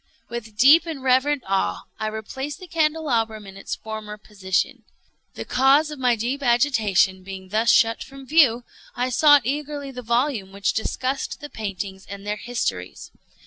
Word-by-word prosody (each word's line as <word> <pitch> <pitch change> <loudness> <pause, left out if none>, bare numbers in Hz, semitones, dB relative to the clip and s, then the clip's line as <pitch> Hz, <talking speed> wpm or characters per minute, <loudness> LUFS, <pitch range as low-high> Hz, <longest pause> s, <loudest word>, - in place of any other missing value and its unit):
With 225 -3 -7
deep 295 +8 +6
and 300 -5 -5
reverent 265 +2 +2
awe 190 - -1 0.2
I 215 - -2
replaced 265 +6 -5
the 370 - -9
candelabrum 300 - 0
in 195 0 -11
its 195 - -5
former 215 -1 -7
position. 195 -3 -2 0.5
The - - -6
cause 275 +4 +3
of 300 - -8
my 250 -2 +3
deep 245 +6 -3
agitation 220 -7 +2
being 190 0 -9
thus 220 +3 +1
shut 225 0 +4
from 270 0 -12
view, 260 -5 +4 0.3
I 250 +1 -1
sought 290 +2 +5
eagerly 285 +1 -3
the 250 -1 -7
volume 235 -4 0
which 200 0 -1
discussed 260 +5 -2
the 295 -1 -9
paintings 195 -2 -6
and 200 0 -8
their 210 0 -2
histories. 210 - -4
235 Hz, 160 wpm, -23 LUFS, 210-275 Hz, 0.5 s, deep